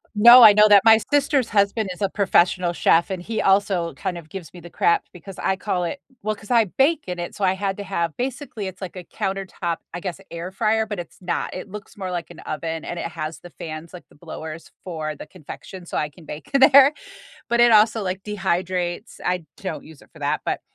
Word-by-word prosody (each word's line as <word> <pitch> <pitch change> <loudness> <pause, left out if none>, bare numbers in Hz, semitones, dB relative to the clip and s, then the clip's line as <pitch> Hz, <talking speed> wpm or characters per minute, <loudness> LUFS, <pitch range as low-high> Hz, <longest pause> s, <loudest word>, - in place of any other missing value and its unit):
No, 235 +4 +9
I 215 -2 +10
know 210 +1 +6
that. 205 -2 +7
My 220 -1 +8
sister's 285 -3 +2
husband 200 0 +1
is 180 - -9
a 200 - +1
professional 185 -3 +2
chef, 170 0 +3
and 190 -2 -3
he 220 +5 -3
also 190 -4 +2
kind 180 +6 -4
of 165 -2 -10
gives 180 -4 -9
me 180 - -11
the 175 0 -12
crap 170 - +2
because 180 +2 -11
I 190 - 0
call 185 -2 -2
it 280 - -5 0.2
well, 215 +1 -2
'cause 205 +2 -12
I 230 -2 +5
bake 280 - +1
in 180 -1 -4
it, 175 - -5
so 205 - -5
I 185 -1 +3
had 195 0 -3
to 205 - -5
have 170 -5 -2
basically, 250 -4 -4
it's 185 0 -9
like 190 -1 -7
a 180 - -7
countertop, 190 -4 -4 0.2
I 175 - -4
guess, 185 0 -6
air 170 +2 -6
fryer, 220 +3 +1
but 210 -3 -5
it's 175 - -9
not. 180 - -2
It 185 - -7
looks 210 +1 -10
more 190 -2 -4
like 175 -2 -4
an - - -13
oven 160 +1 -5
and 175 - -5
it - - -3
has 155 +1 -5
the 175 - -12
fans, 160 0 -8
like 180 - -12
the - - -22
blowers 160 0 -9
for 155 -4 -4
the - - -10
confection, 185 +2 -11
so - - -4
I 150 - -1
can 160 +2 -17
bake 150 +1 -9
in 275 - +3
there, 280 +1 +8 0.6
but 235 0 +2
it 240 0 +6
also, 220 +1 +5
like, 185 0 -3
dehydrates, 185 -1 -2
I 180 -2 -1
don't 190 - -5
use 155 -2 -15
it - - -21
for 160 - -16
that, 145 +1 -1
but - - -2
185 Hz, 235 wpm, -22 LUFS, 170-210 Hz, 0.6 s, I